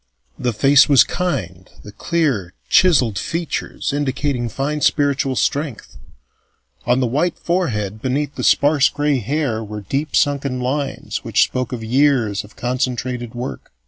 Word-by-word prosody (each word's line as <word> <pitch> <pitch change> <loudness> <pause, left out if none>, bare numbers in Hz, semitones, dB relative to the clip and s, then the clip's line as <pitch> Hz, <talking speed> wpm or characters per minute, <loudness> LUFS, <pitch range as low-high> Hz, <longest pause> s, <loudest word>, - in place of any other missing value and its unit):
The 125 - 0
face 135 +7 +5
was 140 -3 +7
kind, 95 - -3
its 105 - -10
clear 135 - -1
chiselled 130 - +4
features 165 -3 -3
indicating 135 -3 -1
fine 145 +6 -3
spiritual 140 -3 +1
strength; 140 -1 -2 0.9
on 125 +2 +3
the - - +2
white 150 +8 0
forehead 110 - -2
beneath 140 +3 -1
the - - -5
sparse 145 -1 +4
gray 145 -2 0
hair 120 -2 -2
were 105 0 -7
deep 140 - -3
sunken 140 -2 +1
lines 135 +3 -3
which - - +3
spoke 130 -2 -3
of 120 -3 -5
years 120 -4 +2
of 105 - -16
concentrated 125 -1 -3
work. 125 +2 -6
130 Hz, 140 wpm, -19 LUFS, 120-145 Hz, 0.9 s, was